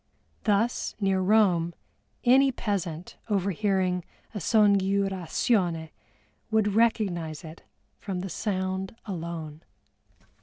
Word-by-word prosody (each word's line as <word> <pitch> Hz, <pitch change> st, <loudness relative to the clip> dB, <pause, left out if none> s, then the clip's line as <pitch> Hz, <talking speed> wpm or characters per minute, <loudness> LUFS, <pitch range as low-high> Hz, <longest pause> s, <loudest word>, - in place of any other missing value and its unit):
Thus 220 Hz, +3 st, +1 dB
near 195 Hz, -2 st, +2 dB
Rome 185 Hz, -4 st, +3 dB, 0.5 s
any 265 Hz, +2 st, +5 dB
peasant 180 Hz, -8 st, -3 dB
overhearing 190 Hz, -2 st, +1 dB, 0.3 s
a 210 Hz, -, -3 dB
scongiurasione 195 Hz, -3 st, +2 dB, 0.6 s
would 215 Hz, -2 st, +2 dB
recognize 190 Hz, -9 st, +1 dB
it 160 Hz, 0 st, -10 dB, 0.4 s
from 185 Hz, -3 st, -4 dB
the 195 Hz, -, -5 dB
sound 190 Hz, +1 st, -2 dB
alone. 165 Hz, -5 st, -6 dB
190 Hz, 85 wpm, -27 LUFS, 170-210 Hz, 0.6 s, any